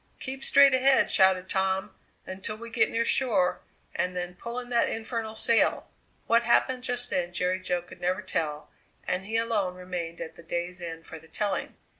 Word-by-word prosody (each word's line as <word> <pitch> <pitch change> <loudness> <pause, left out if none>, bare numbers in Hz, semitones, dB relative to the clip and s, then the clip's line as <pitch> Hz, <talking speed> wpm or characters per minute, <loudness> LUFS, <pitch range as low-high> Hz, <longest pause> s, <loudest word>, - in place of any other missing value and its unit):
"Keep 265 0 -6
straight 280 -1 +6
ahead," 265 +1 +4
shouted 190 -1 +4
Tom, 190 0 0 0.3
"until 190 +3 -5
we 230 +1 -10
get - - +3
near 230 0 0
shore, 205 -11 +2 0.3
and 180 0 -1
then 180 0 -3
pull 235 +6 -6
in 245 -1 -8
that 235 -1 +2
infernal 225 -1 -4
sail!" 225 +1 +2 0.3
What 230 0 +4
happened 250 +2 +2
just 245 -1 -3
then 175 -1 -1
Jerry 180 +1 0
Jo 180 -2 -2
could 175 - -14
never 185 +2 0
tell, 155 -5 -3 0.4
and 185 +1 -1
he 225 +1 0
alone 215 -5 0
remained 180 -2 -5
at 160 - -7
the - - -13
day's 175 +2 -4
end 165 -1 -7
for 160 - -9
the 160 - -18
telling! 200 +5 -2
190 Hz, 185 wpm, -27 LUFS, 180-230 Hz, 0.4 s, straight